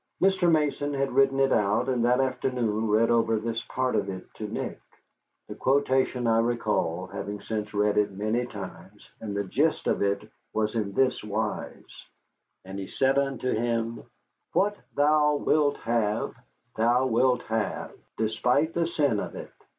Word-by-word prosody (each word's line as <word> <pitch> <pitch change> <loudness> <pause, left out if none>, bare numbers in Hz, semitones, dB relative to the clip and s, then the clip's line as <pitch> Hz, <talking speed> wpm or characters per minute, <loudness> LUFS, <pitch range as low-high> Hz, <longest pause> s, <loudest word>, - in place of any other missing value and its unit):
Mr. 185 -2 +3
Mason 145 -2 +1
had 135 0 0
written 135 +1 +3
it 135 0 +3
out 105 +4 +2
and 125 -3 +1
that 125 +1 +3
afternoon 125 -4 0
read 110 +2 +3
over 115 -1 +3
this 115 +1 -2
part 130 0 -1
of 100 -1 0
it 95 -1 -6
to - - -6
Nick. - - -5 0.7
The - - -6
quotation 130 -2 +1
I 115 -1 +3
recall, 105 -7 0
having 100 +2 -6
since 105 -1 -4
read 105 0 +2
it 105 - +2
many 110 +5 -1
times, 95 -2 -10
and 105 -2 -4
the 100 - 0
gist 145 - 0
of - - +1
it 100 +1 0 0.3
was 110 -1 0
in 105 -4 -2
this 130 -1 +1
wise: 105 0 -5 0.6
"And 95 +1 -6
he 95 - -5
said 135 +1 +2
unto 135 -2 -1
him, 115 0 -1 0.5
'What 205 +2 +2 0.2
thou 150 0 +4
wilt 145 0 +2
have 115 -2 0 0.4
thou 120 +3 +3
wilt 125 0 +2
have, 110 -2 -2 0.3
despite 125 +8 +1
the 170 -1 +1
sin 145 -10 +1
of - - -5
it. - - -8
115 Hz, 160 wpm, -27 LUFS, 105-135 Hz, 0.7 s, thou